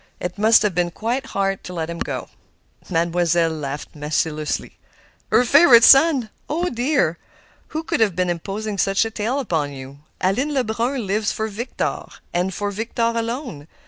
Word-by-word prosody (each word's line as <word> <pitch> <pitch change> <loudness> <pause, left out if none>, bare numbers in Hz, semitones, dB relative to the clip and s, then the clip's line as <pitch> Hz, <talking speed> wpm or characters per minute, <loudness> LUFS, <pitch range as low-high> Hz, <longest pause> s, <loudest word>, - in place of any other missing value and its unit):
It 180 +2 -5
must 220 +1 +5
have 210 -3 +1
been 175 0 0
quite 240 +8 -3
hard 195 -3 -1
to 180 - -8
let 160 -2 -2
him 170 0 -6
go." - - -4 0.6
Mademoiselle 170 -1 +1
laughed 145 -2 -6
maliciously. 150 +1 -2 0.5
"Her 250 - +4
favorite 260 -3 +7
son! 270 -5 +6 0.2
Oh, 345 +4 -1
dear! 245 - 0 0.5
Who 315 +1 -4
could - - -2
have 210 -6 +2
been 180 0 0
imposing 200 +4 -4
such 195 +4 +2
a 225 - -4
tale 230 +6 -2
upon 160 - -2
you? 135 +1 -10 0.2
Aline 255 +11 0
Lebrun 240 0 -1
lives 205 +2 0
for 220 - -2
Victor, 235 +5 -3 0.3
and 180 +2 0
for 205 +2 -3
Victor 230 +2 -1
alone. 230 - -4
205 Hz, 160 wpm, -21 LUFS, 170-240 Hz, 0.6 s, favorite